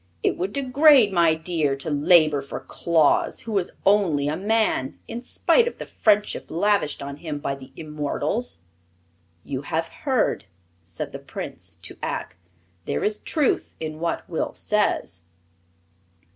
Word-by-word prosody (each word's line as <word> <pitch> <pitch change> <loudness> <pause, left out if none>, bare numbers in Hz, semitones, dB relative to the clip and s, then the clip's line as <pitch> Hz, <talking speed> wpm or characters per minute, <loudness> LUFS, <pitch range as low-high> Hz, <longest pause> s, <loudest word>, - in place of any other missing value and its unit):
It - - +2
would 185 +3 -2
degrade 275 -3 +5
my 170 -3 +4
deer 160 -4 0
to 135 +3 -4
labor 155 -1 +4
for 140 - -6
Claus, 165 -3 +1
who 225 -2 -5
is 180 - -3
only 180 -8 +3
a 150 - 0
man 210 -8 0
in 235 - -5
spite 475 - +2
of 480 - -4
the - - -6
friendship 210 -1 +1
lavished 175 -4 +1
on 140 0 -6
him 150 -2 -5
by 145 -1 -2
the 135 -1 -11
immortals." 145 - -3 0.8
"You 135 -2 -4
have 160 +3 -2
heard," 260 - 0 0.4
said 85 -1 -6
the - - -7
Prince - - -7
to - - -8
Ak. - - -4 0.5
"There - - -2
is 210 0 0
truth 300 -5 0
in 155 -1 -5
what 170 0 -2
Will 165 - -3
says." 205 - 0
165 Hz, 145 wpm, -24 LUFS, 145-210 Hz, 0.8 s, degrade